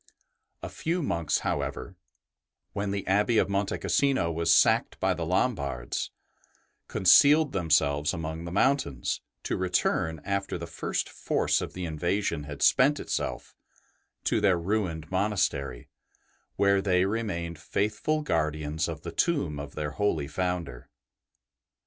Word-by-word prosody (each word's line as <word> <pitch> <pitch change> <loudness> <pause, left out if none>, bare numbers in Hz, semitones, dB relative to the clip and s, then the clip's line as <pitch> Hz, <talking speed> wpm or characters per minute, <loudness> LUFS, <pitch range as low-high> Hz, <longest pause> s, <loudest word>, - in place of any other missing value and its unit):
A - - -4
few 170 +1 -2
monks, 85 - 0
however, 90 - -3 0.8
when 100 0 -2
the 100 0 -3
Abbey 105 +4 +2
of - - +3
Monte 100 0 -1
Cassino 135 -12 +1
was 80 0 +1
sacked - - +4
by - - +2
the - - -4
Lombards, 65 -4 -1 0.8
concealed 145 - +5
themselves 75 -4 +2
among 80 0 -5
the 85 - -6
mountains, 100 - 0 0.2
to - - -1
return, 90 -2 0
after 100 -1 -2
the 85 - -6
first 80 - -3
force - - 0
of - - -5
the 90 -1 -4
in 80 -2 -5
vasion 85 -4 -1
had 75 -1 -4
spent 145 +3 +4
itself, - - -4 0.7
to - - +1
their 95 -3 +4
ruined 85 -4 -2
monastery, 95 - -1 0.7
where 100 -1 +3
they 95 -2 +2
remained 90 -6 -3
faithful 130 - -1
guardians 75 - -1
of 80 -2 -6
the 85 - -5
tomb 95 - 0
of 70 0 -8
their 75 -1 -3
holy 80 -5 0
Founder. 85 -6 -3
90 Hz, 135 wpm, -28 LUFS, 80-100 Hz, 0.8 s, concealed